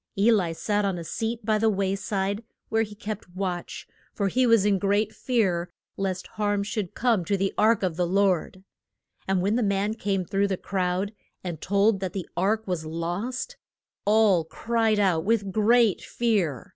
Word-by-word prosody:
E 210 +4 +5
li 190 -7 +2
sat 205 +6 -1
on 195 -3 0
a 170 - -5
seat 225 +6 -3
by 215 -1 +2
the 225 +1 +3
way 195 -1 0
side, 200 +1 -2 0.3
where 225 0 +2
he 210 -1 -4
kept 205 -3 -7
watch, 185 -2 -4 0.3
for 200 -1 0
he 255 +4 +2
was 230 -4 +5
in 200 -2 +3
great 205 +2 +1
fear 190 -9 0 0.3
lest 190 -1 -2
harm 205 -1 -1
should 205 -3 -4
come 230 -7 +2
to 200 +3 0
the 195 0 0
ark 215 -1 +3
of 175 -3 -1
God. 185 0 +1 0.6
And 190 -2 +1
when 205 +4 +2
the - - +1
man 200 0 +1
came 195 -4 -1
through 200 +3 +1
the 190 -2 -1
crowd 190 +2 -1 0.3
and 175 -4 -5
told 200 +1 +2
that 190 0 -4
the 190 -4 -4
ark 215 +5 +1
was 180 -4 -2
lost, 180 - -4 0.5
all 210 -5 +4
cried 225 +6 0
out 180 -5 +2
with 205 -2 +1
great 220 -1 +3
fear. 195 - -1
200 Hz, 180 wpm, -26 LUFS, 185-220 Hz, 0.6 s, E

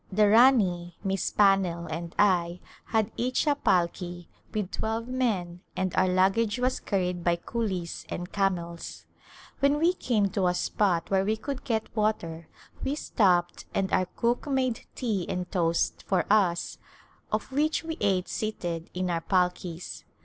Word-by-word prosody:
The 210 +2 +4
Rani, 200 -8 +4
Miss 195 -1 0
Pannell 195 -4 +3
and 170 +1 -5
I 180 -3 +3 0.3
had 220 -1 0
each 250 +5 0
a 295 - +4
palki 175 -7 0 0.3
with 210 -3 -3
twelve 225 +1 -2
men 205 -9 -1 0.2
and 185 -1 -1
our 185 0 +3
luggage 195 +5 +2
was 255 +1 0
carried 180 -3 -1
by 175 0 +3
coolies 185 -2 -4
and 175 +1 -5
camels. 175 -4 -2 0.5
When 280 +1 +3
we 335 +4 +3
came 215 - +1
to 195 -2 +1
a 180 - +1
spot 180 -2 0
where 190 -1 +3
we 215 +2 0
could 275 +3 -5
get 220 -2 -2
water 170 -7 -1 0.4
we 275 - 0
stopped 180 -11 +1
and 195 -1 0
our 185 - +3
cook 235 +8 -1
made 260 -4 -1
tea 215 -8 -1
and 180 0 -3
toast 170 -3 +1
for 185 -3 +2
us 185 -5 +2 0.5
of - - -2
which 300 +4 +1
we 325 0 -4
ate 185 -2 +1
seated 175 -6 -3
in 185 0 -1
our 165 -1 -1
palkis. 180 -1 -1
195 Hz, 155 wpm, -27 LUFS, 175-225 Hz, 0.5 s, The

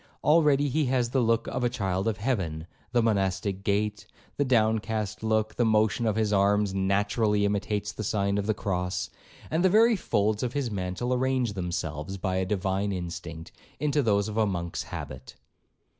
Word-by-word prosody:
Already 150 -2 +4
he 150 +3 +1
has 125 -2 0
the 135 - +2
look 115 -1 +2
of 125 - -3
a 120 - +3
child 95 -3 -1
of 110 -2 0
heaven;—the 100 0 -2
monastic 95 -2 0
gait, 105 +1 -1 0.3
—the 145 - +1
downcast 110 -4 0
look;—the 110 +1 0
motion 110 +1 +2
of 110 - +1
his 110 -1 +1
arms 100 0 +3
naturally 105 +2 +1
imitates 105 0 -1
the 105 - -6
sign 100 0 0
of 100 - -3
the 110 - +1
cross, 90 -3 -2 0.4
and 160 +3 +1
the 190 - +5
very 225 +4 +5
folds 105 - 0
of 125 -1 -2
his 140 -5 -1
mantle 95 +6 -2
arrange 130 -3 0
themselves, 90 -2 -4
by 95 0 -1
a 95 - 0
divine 95 +1 -1
instinct, 85 -3 -6 0.3
into 150 0 +1
those 100 -4 +2
of 105 0 -5
a 110 -1 +3
Monk's 85 -3 -3
habit.' 65 0 -8
105 Hz, 170 wpm, -27 LUFS, 95-120 Hz, 0.4 s, the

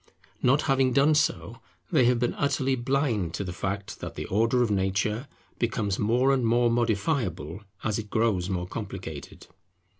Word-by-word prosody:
Not 135 +4 +3
having 135 -3 +2
done 140 +4 +4
so, 150 - 0 0.3
they 125 - +4
have 125 0 +4
been 120 0 0
utterly 135 -2 0
blind 120 - 0
to - - -3
the 90 -2 -5
fact 100 +3 -4
that - - -7
the - - -4
Order 115 +5 +2
of 115 - 0
nature 100 +6 0 0.3
becomes 115 -5 -1
more 125 +6 +3
and 130 -2 +1
more 120 +1 +3
modifiable 105 - -1 0.2
as 110 0 0
it 105 -1 -7
grows 105 -5 +1
more 90 -2 -2
complicated. - - -7
115 Hz, 160 wpm, -27 LUFS, 100-130 Hz, 0.3 s, done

